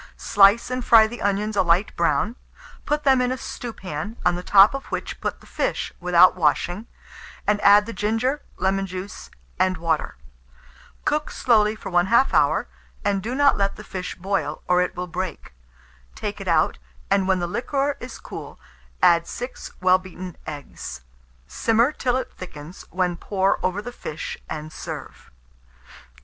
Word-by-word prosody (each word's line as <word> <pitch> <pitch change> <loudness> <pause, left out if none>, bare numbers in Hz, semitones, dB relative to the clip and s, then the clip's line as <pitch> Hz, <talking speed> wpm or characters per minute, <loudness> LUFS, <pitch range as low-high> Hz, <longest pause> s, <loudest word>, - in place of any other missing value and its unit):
Slice 205 +5 +4
and 255 0 -2
fry 225 -2 +7
the 240 +2 -7
onions 205 +2 0
a - - +4
light 180 +3 +2
brown; 225 +4 +1 0.5
put 295 0 0
them 265 -2 +4
in 250 0 +1
a 260 - -2
stewpan, 210 -5 -6
on 180 - +4
the 175 - -4
top 195 +4 +6
of 275 - -5
which - - -5
put - - -3
the - - -17
fish - - -2
without 180 0 +5
washing, 175 +5 0 0.6
and 210 0 +1
add 205 +1 +7
the 230 - -6
ginger, 225 +8 0 0.2
lemon 195 0 0
juice, 185 +1 -7 0.3
and 185 0 +2
water. 160 -1 -1 0.9
Cook 300 0 0
slowly 215 -3 +2
for 215 - -8
1/2 190 +9 +3
hour, - - +3 0.4
and 200 -1 +1
do 235 +6 -4
not 285 0 +4
let 200 0 0
the - - -10
fish 185 -1 -6
boil, 195 +2 -2
or 180 0 +4
it 180 - -2
will 180 0 -3
break. 180 - -5 0.6
Take - - -5
it - - -7
out, - - +2 0.3
and 195 -1 +3
when 190 -1 +3
the 175 - -1
liquor 275 +9 -1
is 250 - -8
cool, - - -9 0.4
add 170 -2 +5
6 245 +1 -6
well 185 0 +5
beaten 185 -1 -9
eggs; 145 - -7 0.4
simmer 230 - +2
till 255 -4 0
it 260 - -5
thickens, 175 -1 -10
when 180 -1 -1
pour 195 +1 0
over 190 +3 -1
the 245 - -6
fish, 160 -9 -6
and 155 0 -6
serve. - - -8
195 Hz, 165 wpm, -23 LUFS, 180-235 Hz, 0.9 s, fry